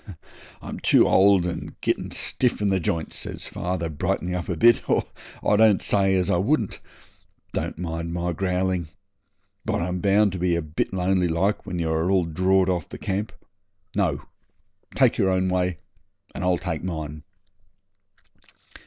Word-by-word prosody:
'I'm -, -, -6 dB
too -, -, +4 dB
old 95 Hz, -2 st, +5 dB
and 90 Hz, -, -5 dB
getting -, -, -1 dB
stiff 125 Hz, -2 st, 0 dB
in 105 Hz, -1 st, +1 dB
the 95 Hz, -1 st, +2 dB
j'ints,' 80 Hz, -1 st, -2 dB
says -, -, -6 dB
dad, 85 Hz, -4 st, -3 dB
brightening 90 Hz, -1 st, -1 dB
up 90 Hz, -1 st, -4 dB
a 90 Hz, -, -2 dB
bit, 120 Hz, +6 st, +4 dB
'or -, -, +3 dB, 0.4 s
I -, -, +5 dB
don't 110 Hz, -2 st, +5 dB
say 95 Hz, -1 st, +2 dB
as 90 Hz, -2 st, +1 dB
I -, -, +3 dB
wouldn't. 110 Hz, -, 0 dB, 0.7 s
Don't -, -, -3 dB
mind 85 Hz, -1 st, -4 dB
my 85 Hz, 0 st, -2 dB
growling. 90 Hz, -1 st, -1 dB, 0.8 s
But -, -, -1 dB
I'm 90 Hz, +1 st, -2 dB
bound 100 Hz, +2 st, +3 dB
to 90 Hz, -, -5 dB
be 90 Hz, -1 st, +1 dB
a 85 Hz, -, 0 dB
bit 75 Hz, 0 st, -2 dB
lonely 95 Hz, -1 st, +1 dB
like 90 Hz, +5 st, 0 dB
when 90 Hz, -3 st, -3 dB
you 80 Hz, -2 st, -1 dB
are 80 Hz, +2 st, 0 dB
all 95 Hz, -3 st, +3 dB
drawed 95 Hz, +3 st, +2 dB
off 90 Hz, -4 st, -1 dB
the -, -, -8 dB
camp. 100 Hz, +3 st, -3 dB, 0.6 s
No! -, -, 0 dB, 0.7 s
take -, -, +3 dB
your 95 Hz, -, +3 dB
own 95 Hz, 0 st, +1 dB
way 90 Hz, -2 st, 0 dB, 0.6 s
and -, -, -5 dB
I'll 90 Hz, -1 st, +2 dB
take 80 Hz, -3 st, -4 dB
mine.' 80 Hz, -4 st, -5 dB
90 Hz, 165 wpm, -24 LUFS, 85-95 Hz, 0.8 s, old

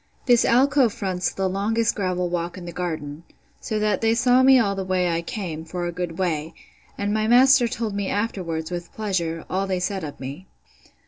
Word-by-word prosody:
This 240 Hz, -2 st, +4 dB
alcove 260 Hz, -1 st, +4 dB
fronts 190 Hz, -5 st, -2 dB
the 190 Hz, -1 st, -1 dB
longest 215 Hz, +4 st, 0 dB
gravel 185 Hz, -3 st, -1 dB
walk 175 Hz, 0 st, -3 dB
in 180 Hz, -, -8 dB
the 175 Hz, -, -6 dB
garden, 160 Hz, -4 st, -4 dB, 0.4 s
so 220 Hz, -, -3 dB
that 210 Hz, 0 st, 0 dB
they 225 Hz, 0 st, +3 dB
saw 250 Hz, +2 st, +4 dB
me 265 Hz, 0 st, +7 dB
all 205 Hz, -5 st, +2 dB
the 195 Hz, -1 st, -3 dB
way 185 Hz, -1 st, 0 dB
I 170 Hz, -1 st, 0 dB
came, 170 Hz, -5 st, -5 dB
for 175 Hz, +2 st, -4 dB
a 175 Hz, -, -2 dB
good 175 Hz, -1 st, -5 dB
way: 165 Hz, -4 st, -2 dB, 0.4 s
and 205 Hz, 0 st, -1 dB
my 215 Hz, 0 st, 0 dB
master 255 Hz, +1 st, +6 dB
told 230 Hz, -3 st, -3 dB
me 200 Hz, -1 st, -2 dB
afterwards, 180 Hz, -7 st, -2 dB
with 175 Hz, -1 st, -5 dB
pleasure, 170 Hz, -6 st, -2 dB
all 195 Hz, +1 st, -1 dB
they 185 Hz, -1 st, -1 dB
said 190 Hz, +1 st, -2 dB
of 145 Hz, -2 st, -7 dB
me. 140 Hz, +8 st, -8 dB
190 Hz, 200 wpm, -23 LUFS, 175-225 Hz, 0.4 s, me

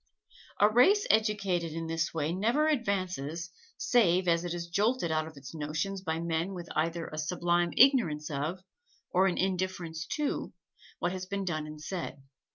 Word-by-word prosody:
A 205 Hz, -, +7 dB
race 360 Hz, -, +5 dB
educated 200 Hz, -6 st, +1 dB
in 165 Hz, 0 st, -4 dB
this 165 Hz, 0 st, -1 dB
way 160 Hz, 0 st, -1 dB
never 235 Hz, +11 st, +2 dB
advances, 185 Hz, -, -1 dB, 0.3 s
save 190 Hz, -, +3 dB
as 170 Hz, 0 st, +3 dB
it 175 Hz, -, -3 dB
is 175 Hz, 0 st, -3 dB
jolted 200 Hz, +1 st, +1 dB
out 155 Hz, 0 st, 0 dB
of 160 Hz, -2 st, -12 dB
its 130 Hz, 0 st, -10 dB
notions 160 Hz, +6 st, -3 dB
by 160 Hz, -3 st, -2 dB
men 170 Hz, +3 st, -1 dB
with 175 Hz, -1 st, -7 dB
either 165 Hz, +1 st, 0 dB
a 155 Hz, -, -5 dB
sublime 175 Hz, +2 st, +1 dB
ignorance 175 Hz, -, +4 dB
of, 155 Hz, +6 st, -3 dB, 0.5 s
or 190 Hz, +1 st, +4 dB
an 180 Hz, -, 0 dB
indifference 185 Hz, -4 st, -2 dB
to, 300 Hz, -2 st, -2 dB, 0.4 s
what 175 Hz, -, -1 dB
has 185 Hz, 0 st, -5 dB
been 200 Hz, 0 st, -3 dB
done 155 Hz, -4 st, -2 dB
and 155 Hz, 0 st, -9 dB
said. 155 Hz, -4 st, -5 dB
175 Hz, 165 wpm, -30 LUFS, 160-195 Hz, 0.5 s, A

